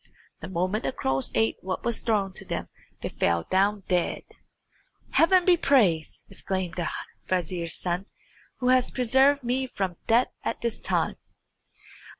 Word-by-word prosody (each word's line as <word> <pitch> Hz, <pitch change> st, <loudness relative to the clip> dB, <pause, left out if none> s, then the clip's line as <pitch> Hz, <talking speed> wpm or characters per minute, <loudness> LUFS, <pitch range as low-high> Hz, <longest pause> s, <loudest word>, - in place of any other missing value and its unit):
The -, -, -7 dB
moment 185 Hz, +4 st, -1 dB
the -, -, 0 dB
crows 135 Hz, -, -1 dB
ate 110 Hz, 0 st, +2 dB
what 185 Hz, 0 st, -4 dB
was 235 Hz, -1 st, 0 dB
thrown 205 Hz, -4 st, 0 dB
to -, -, -6 dB
them -, -, -4 dB, 0.3 s
they -, -, -2 dB
fell 85 Hz, -1 st, +1 dB
down 200 Hz, +2 st, +2 dB
dead. 180 Hz, -2 st, 0 dB, 0.9 s
"Heaven 360 Hz, +2 st, +5 dB
be 360 Hz, -, +6 dB
praised," 200 Hz, -, +2 dB
exclaimed 190 Hz, -3 st, -3 dB
the 175 Hz, 0 st, -2 dB, 0.4 s
vizier's 175 Hz, -2 st, -1 dB
son, 180 Hz, +2 st, -2 dB, 0.5 s
"who 250 Hz, -1 st, 0 dB
has 255 Hz, -1 st, +4 dB
preserved 265 Hz, +3 st, +3 dB
me 255 Hz, +2 st, 0 dB
from 190 Hz, -7 st, -3 dB
death 235 Hz, +3 st, +4 dB
at -, -, -3 dB
this 235 Hz, -1 st, -2 dB
time!" -, -, 0 dB
195 Hz, 150 wpm, -26 LUFS, 175-250 Hz, 0.9 s, be